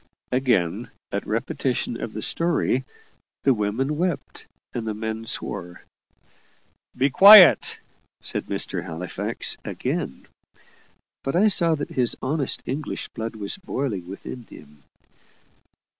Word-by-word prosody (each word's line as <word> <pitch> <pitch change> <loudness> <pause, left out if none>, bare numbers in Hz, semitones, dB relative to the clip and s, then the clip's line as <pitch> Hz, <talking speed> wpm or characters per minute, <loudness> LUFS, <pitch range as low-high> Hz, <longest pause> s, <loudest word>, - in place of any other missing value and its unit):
Again, 120 -10 +1 0.2
at - - -3
repetition - - -2
of - - -4
the - - -5
story, 165 -6 0 0.6
the 135 - +5
women 120 +7 -1
wept 175 -3 -3 0.3
and 115 -2 -4
the 110 - -2
men 110 +1 -4
swore. 90 -5 -4 1.1
"Be 135 +2 +2
quiet," 195 +3 +9 0.4
said - - -3
Mr. - - -2
Halifax 85 +2 -2
again. - - -4 1.0
But 135 - -2
I 210 +5 +5
saw 170 -5 +2
that 145 - -5
his 125 -3 +1
honest 140 0 -1
English 140 +3 -4
blood 115 0 -6
was 105 - -2
boiling 130 - -4
within 100 +6 -8
him. 75 0 -15
125 Hz, 115 wpm, -24 LUFS, 105-150 Hz, 1.1 s, quiet